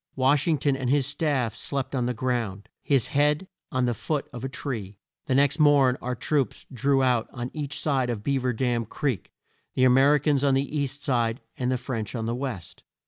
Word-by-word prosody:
Wash 135 +3 +3
ing 160 -2 +3
ton 140 0 +1
and 130 -2 -2
his 140 0 +3
staff 140 -5 0
slept 140 -1 -3
on 125 -3 0
the 125 - 0
ground, 115 -5 -2
his 135 -5 +1
head 150 +5 +2 0.2
on 130 -1 +1
the 120 -1 0
root 150 -3 0
of 120 0 -7
a 135 - -2
tree. 115 -8 -5 0.3
The 130 - +1
next 140 +3 +3
morn 145 -4 +5
our 125 0 -2
troops 140 +2 -1
drew 135 +2 +2
out 125 -3 +2
on 120 -1 -5
each 150 -2 -4
side 135 -5 +1
of 110 -4 -3
Bea 140 +2 +1
ver 125 0 0
Dam 120 -1 0
Creek, 125 - -2 0.4
the 130 - +2
A 130 - +6
mer 135 +3 +6
i - - +5
cans 145 -1 +1
on 140 -2 +4
the 140 +3 -1
east 140 0 -2
side 120 -3 +1 0.2
and 125 0 -1
the 130 - +1
French 120 -3 -4
on 115 -2 -2
the 115 - -1
west. 120 -9 -5
130 Hz, 220 wpm, -26 LUFS, 120-140 Hz, 0.4 s, A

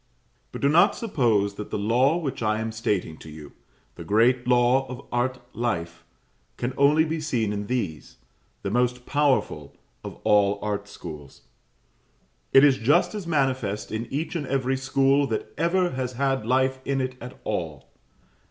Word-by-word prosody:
But - - -7
do 140 - +3
not 170 +8 +5
suppose 115 - +1
that 105 - -6
the - - -2
law 125 +9 +2
which 150 -9 -4
I 110 -1 +1
am 110 0 -3
stating 105 -8 -2
to 80 - -12
you 75 -2 -11 0.4
the - - -9
great 120 +4 +2
law 125 +2 +3
of 125 0 -8
art 125 +1 -1 0.2
life 85 -9 -3 0.5
can 120 +2 -3
only 150 +3 +4
be 160 0 -2
seen 115 -9 -1
in 105 0 -4
these, 95 - -4 0.5
the 100 - -2
most 125 +1 0
powerful 135 - 0 0.3
of - - -7
all 100 -1 +3
art 105 -1 -3
schools. 75 -10 -10 1.1
It 135 - +7
is 140 -2 +5
just 145 - +3
as 205 -5 -6
manifest 130 -9 -1
in 110 +2 -3
each 155 +5 -3
and 150 -5 -3
every 135 -1 0
school 135 +1 +2
that 110 - -4
ever 175 +1 +1
has 130 -1 -3
had 135 -3 -1
life 130 +1 +2
in 135 0 -1
it 130 0 -2
at 125 +2 -9
all. 80 -9 -4
125 Hz, 165 wpm, -25 LUFS, 105-135 Hz, 1.1 s, It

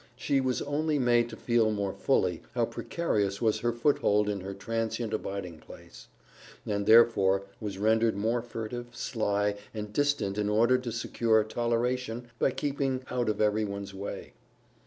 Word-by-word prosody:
She 135 +2 +1
was 130 -1 -1
only 150 +1 0
made 120 -2 +3
to 115 - -8
feel 120 -2 +2
more 100 -3 -1
fully - - +1
how - - +2
precarious 100 -12 -2
was 110 -2 +1
her 120 - 0
foothold 110 -4 +2
in 100 -1 -2
her 100 +1 -6
transient 115 +2 -3
abiding 95 -6 -4
place, - - -14 0.6
and 100 -1 -2
therefore 100 -4 +5 0.2
was 100 -3 -5
rendered 110 +2 +2
more 115 +4 0
furtive, 120 +1 -6
sly, 105 -3 -1 0.2
and 105 -1 -5
distant 145 -8 0
in 105 0 0
order 120 +4 +4
to 125 -2 -5
secure 115 -1 +1
toleration 120 +1 -2
by - - +3
keeping 135 -1 -2
out 120 -3 0
of 105 - -1
everyone's 105 -2 0
way. 100 +1 -7
115 Hz, 155 wpm, -29 LUFS, 105-120 Hz, 0.6 s, therefore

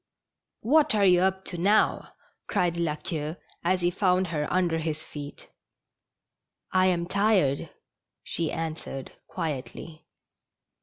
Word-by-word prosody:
" - - -62 0.2
What 290 +1 +4
are 205 -1 +4
you 180 -2 +6
up 190 +1 +1
to 175 - -4
now? 205 +5 +2 0.3
cried 175 -1 +1
La 170 -3 0
Queue, 155 0 -4 0.3
as 180 +1 +1
he 175 0 +2
found 185 0 +2
her 150 -2 -2
under 175 -3 +1
his 155 -1 -3
feet. 145 -1 -9 0.6
" - - -61 0.3
I 185 0 +4
am 175 -2 +1
tired,'' 190 -7 +2 0.5
she 165 -2 -2
answered, 155 -4 -5 0.2
quietly. 155 0 -5
175 Hz, 135 wpm, -27 LUFS, 155-185 Hz, 0.6 s, you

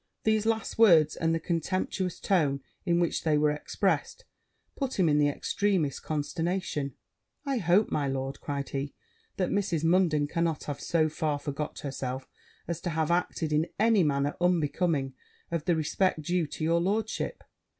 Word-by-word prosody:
These 220 0 +2
last 225 0 -1
words, 165 -9 +6
and 165 0 +1
the - - 0
contemptuous 180 +2 -2
tone 145 -8 +1 0.3
in 170 0 +3
which 170 -2 0
they 155 -2 +3
were 150 0 +3
expressed, 150 - -1 0.5
put 270 -2 -3
him 180 - +4
into 150 -1 +3
the - - +3
extremest 180 -1 0
consternation: 155 -2 -2 0.5
'I 275 -2 0
hope, 185 +3 +3
my 145 -2 0
lord,' 135 0 -3
cried 140 -1 -3
he, 140 +1 -4 0.4
'that 185 -3 0
Mrs. 185 -6 0
Munden 165 -3 +3
cannot 165 0 -1
have 145 -1 -5
so 160 -2 +2
far 155 -1 -1
forgot 145 +1 -5
herself 130 -2 -4 0.4
as 170 -1 -3
to 175 - -2
have 160 0 0
acted 170 -2 0
in 155 +2 +2
any 220 -1 +4
manner 145 -2 +1
unbecoming 165 -5 +1 0.4
of 165 -2 -2
the 175 - +3
respect 160 +1 0
due 175 0 0
to 155 - -6
your 170 +1 +2
lordship.' 215 - -1
165 Hz, 160 wpm, -28 LUFS, 145-180 Hz, 0.5 s, words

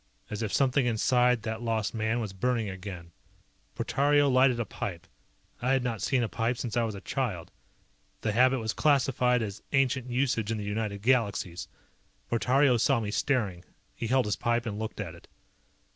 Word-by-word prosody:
As 105 +1 -3
if 110 -3 -2
something 135 -1 +2
inside 125 +1 +2
that 110 +1 -4
lost 115 -3 -1
man 110 +1 0
was 105 -4 -4
burning 115 +2 0
again. 90 -3 -8 0.6
Portario 145 +1 +2
lighted 130 -1 +4
a 120 - -1
pipe. 85 -6 -6 0.6
I 125 +2 +2
had 135 -2 +1
not 115 -4 -2
seen 130 -3 +1
a - - 0
pipe 115 +2 -1
since 120 -3 -4
I 120 - +3
was 110 -2 -4
a 100 - -8
child. 110 - -3 0.7
The 110 - 0
habit 130 +4 +4
was 110 -2 -2
classified 125 -4 +2
as 100 -1 -6
ancient 130 -2 +1
usage 120 -4 0
in 115 - -1
the 105 - -4
United 105 -1 -3
Galaxies. 105 -8 +1 0.6
Portario 125 +2 +3
saw 135 +1 +3
me 105 -2 -3
staring. 105 -9 0 0.3
He 115 - -4
held 130 +2 +2
his 105 - -1
pipe 120 0 0
and 105 -2 -4
looked 110 0 -5
at 90 -6 -4
it. 85 - -16
115 Hz, 180 wpm, -28 LUFS, 105-125 Hz, 0.7 s, lighted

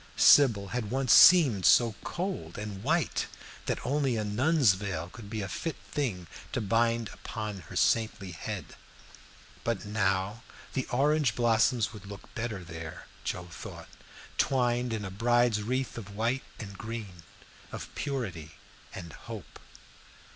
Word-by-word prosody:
Sybil 110 -9 +6
had 115 -2 -3
once 130 -1 +3
seemed 145 - +8
so 115 +2 +6
cold 175 - -4
and 105 -2 -5
white 160 +1 +1 0.4
that - - 0
only 135 -2 +1
a 110 - 0
nun's 125 - +3
veil 95 -4 -4
could 105 -2 -10
be 110 -1 -3
a - - -3
fit 165 +9 -3 0.2
thing 115 -12 -2 0.3
to - - 0
bind 115 +1 +1
upon 105 -3 -5
her - - -9
saintly 105 -4 +1
head; 80 - -6 0.9
but 115 -5 -1
now 100 +1 0 0.3
the 130 - -2
orange 140 -2 +2
blossoms 115 -1 +2
would 100 -2 -10
look 100 -1 -11
better 115 -6 -4
there, 80 -1 -8 0.2
Joe 90 -1 -4
thought, 65 - -9 0.5
twined 125 -2 +2
in 110 -2 -2
a 95 - -5
bride's 120 +1 +2
wreath 130 +3 -2
of 100 -2 -10
white 120 +5 0 0.2
and 100 -3 -7
green, 105 -4 -7 0.5
of - - -7
purity 100 - -4 0.4
and 85 -2 -8
hope. - - -9
110 Hz, 140 wpm, -29 LUFS, 100-125 Hz, 0.9 s, seemed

